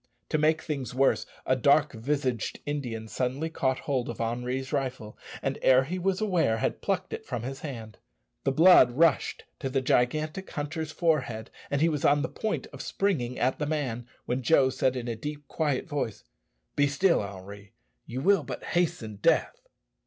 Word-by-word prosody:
To 155 Hz, -, +1 dB
make 155 Hz, +1 st, +2 dB
things 135 Hz, -6 st, -4 dB
worse, 130 Hz, -5 st, +2 dB, 0.2 s
a 130 Hz, -, +3 dB
dark 140 Hz, +4 st, +4 dB
visaged 130 Hz, 0 st, -2 dB
Indian 125 Hz, -7 st, -3 dB
suddenly 130 Hz, +7 st, -2 dB
caught 130 Hz, -4 st, 0 dB
hold 130 Hz, -4 st, -1 dB
of 120 Hz, -, -6 dB
Henri's 125 Hz, +3 st, -2 dB
rifle, 125 Hz, -5 st, -3 dB, 0.3 s
and, -, -, -1 dB
ere 130 Hz, 0 st, +6 dB
he 180 Hz, +7 st, -4 dB
was 190 Hz, +1 st, 0 dB
aware, 180 Hz, -, +2 dB
had -, -, -1 dB
plucked 190 Hz, -2 st, -1 dB
it -, -, -5 dB
from 120 Hz, -, -4 dB
his 135 Hz, +2 st, -5 dB
hand. 115 Hz, -8 st, -7 dB, 0.4 s
The -, -, +2 dB
blood 155 Hz, -5 st, +7 dB
rushed 155 Hz, -3 st, +2 dB, 0.2 s
to 135 Hz, -, -2 dB
the 135 Hz, +1 st, +1 dB
gigantic 155 Hz, +8 st, 0 dB
hunter's 155 Hz, +1 st, -4 dB
forehead, 130 Hz, -11 st, 0 dB, 0.2 s
and 140 Hz, 0 st, 0 dB
he 165 Hz, -, +5 dB
was 150 Hz, -3 st, -2 dB
on 145 Hz, 0 st, +4 dB
the -, -, -2 dB
point 220 Hz, -, -2 dB
of -, -, -7 dB
springing 135 Hz, -12 st, -1 dB
at 130 Hz, +1 st, +1 dB
the 150 Hz, -, -1 dB
man, 130 Hz, -6 st, -2 dB, 0.2 s
when 125 Hz, +2 st, -1 dB
Joe 130 Hz, 0 st, +4 dB
said 130 Hz, 0 st, +1 dB
in 125 Hz, -1 st, -4 dB
a 115 Hz, -, -2 dB
deep 145 Hz, +5 st, -6 dB
quiet 150 Hz, -5 st, -1 dB
voice, 145 Hz, -8 st, -3 dB, 0.5 s
"Be 145 Hz, 0 st, +4 dB
still, 170 Hz, +6 st, +3 dB
Henri. 100 Hz, +1 st, -9 dB, 0.3 s
You 125 Hz, +2 st, -4 dB
will 195 Hz, +3 st, +4 dB
but -, -, -7 dB
hasten 125 Hz, -, -1 dB
death." 165 Hz, -, +1 dB
135 Hz, 180 wpm, -28 LUFS, 120-155 Hz, 0.5 s, blood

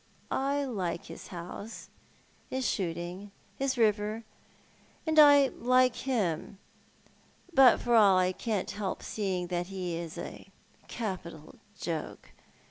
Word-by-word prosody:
I 280 Hz, +1 st, 0 dB
like 185 Hz, -9 st, -3 dB
his -, -, -10 dB
house, 180 Hz, +5 st, -8 dB, 0.6 s
his 260 Hz, -1 st, -1 dB
shooting, 175 Hz, +2 st, -3 dB, 0.3 s
and 275 Hz, 0 st, 0 dB
liis 260 Hz, -, -1 dB
river, 215 Hz, 0 st, +1 dB, 0.8 s
and 315 Hz, -1 st, +3 dB
I 285 Hz, -2 st, +8 dB
like 255 Hz, +1 st, +3 dB
him; 205 Hz, -6 st, -2 dB, 1.0 s
but 265 Hz, -4 st, +7 dB
for 240 Hz, -, 0 dB
all 200 Hz, -4 st, +6 dB
that 185 Hz, -, +4 dB
I 180 Hz, -, +1 dB
can't 205 Hz, 0 st, -2 dB
help 200 Hz, -2 st, -4 dB
seeing 190 Hz, -4 st, -2 dB
that 175 Hz, -1 st, -2 dB
he 185 Hz, -3 st, -4 dB
is 165 Hz, -1 st, -6 dB
a -, -, -8 dB, 0.4 s
capital 180 Hz, -8 st, -6 dB, 0.2 s
joke. 160 Hz, -3 st, -5 dB
205 Hz, 125 wpm, -30 LUFS, 180-250 Hz, 1.0 s, I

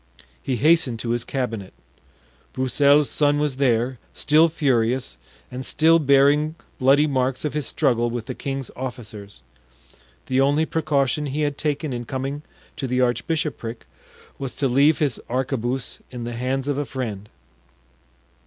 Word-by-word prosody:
He 130 Hz, -, -1 dB
hastened 140 Hz, -2 st, +3 dB
to 115 Hz, -, -2 dB
his 120 Hz, -1 st, 0 dB
cabinet. 115 Hz, -8 st, -4 dB, 0.8 s
Broussel's 140 Hz, +3 st, +3 dB
son 145 Hz, -1 st, +2 dB
was 145 Hz, -3 st, -1 dB
there, 125 Hz, -2 st, +1 dB, 0.2 s
still 155 Hz, +2 st, +4 dB
furious, 125 Hz, -, 0 dB, 0.4 s
and 125 Hz, +1 st, -5 dB
still 160 Hz, +4 st, +4 dB
bearing 145 Hz, +2 st, +3 dB, 0.2 s
bloody 140 Hz, +3 st, +5 dB
marks 130 Hz, -1 st, -1 dB
of 150 Hz, -, -2 dB
his 150 Hz, -2 st, -2 dB
struggle 120 Hz, -5 st, +1 dB
with 120 Hz, -1 st, -4 dB
the -, -, -5 dB
king's 135 Hz, -1 st, -5 dB
officers. 110 Hz, -, -7 dB, 0.8 s
The 130 Hz, +1 st, +1 dB
only 145 Hz, +3 st, +3 dB
precaution 150 Hz, -3 st, 0 dB
he 145 Hz, +3 st, -2 dB
had 145 Hz, -1 st, 0 dB
taken 150 Hz, -1 st, -2 dB
in 120 Hz, 0 st, -4 dB
coming 135 Hz, +4 st, -4 dB, 0.4 s
to 135 Hz, -, -3 dB
the 125 Hz, 0 st, 0 dB
archbishopric 125 Hz, -1 st, -1 dB, 0.5 s
was 135 Hz, -2 st, -4 dB
to 140 Hz, -, +1 dB
leave 140 Hz, +5 st, +4 dB
his 140 Hz, -6 st, 0 dB
arquebuse 130 Hz, 0 st, -2 dB
in 125 Hz, -2 st, -7 dB
the 120 Hz, 0 st, -4 dB
hands 130 Hz, +3 st, -2 dB
of 145 Hz, -1 st, 0 dB
a 145 Hz, -, -1 dB
friend. 110 Hz, -7 st, -5 dB
135 Hz, 145 wpm, -23 LUFS, 120-145 Hz, 0.8 s, bloody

